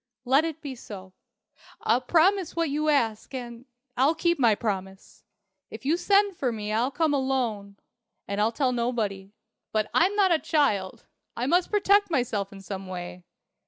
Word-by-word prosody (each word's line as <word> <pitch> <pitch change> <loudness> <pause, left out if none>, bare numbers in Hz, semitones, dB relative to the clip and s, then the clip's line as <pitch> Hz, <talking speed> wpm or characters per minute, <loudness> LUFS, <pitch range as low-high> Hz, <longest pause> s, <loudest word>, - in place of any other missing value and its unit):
"Let 270 +5 +4
it 320 -1 -5
be 280 -2 -5
so. 190 -6 -10 0.7
I'll 235 +4 +2
promise 350 +6 +2
what 330 -3 0
you 305 +2 0
ask, 235 -4 0
and 240 -1 -7 0.3
I'll 275 +6 +3
keep 340 +1 +1
my 230 -5 +4
promise. 195 -3 -5 0.5
If 220 +3 -10
you 305 +4 +3
send 400 +2 +2
for 260 -6 -1
me, 215 -1 -4
I'll 235 +4 +1
come 310 +1 0
alone. 240 -7 -1 0.5
And 200 +1 -2
I'll 220 +2 +2
tell 255 +2 0
nobody. 220 -5 -2 0.4
But 215 -1 -1
I'm 375 +5 +3
not 395 -3 +3
a 330 - +4
child. 210 - 0 0.3
I 245 - -1
must 350 +6 +2
protect 410 -1 +3
myself 225 - -1
in 195 -1 -11
some 195 0 -7
way. 180 -1 -7
250 Hz, 165 wpm, -26 LUFS, 210-320 Hz, 0.7 s, Let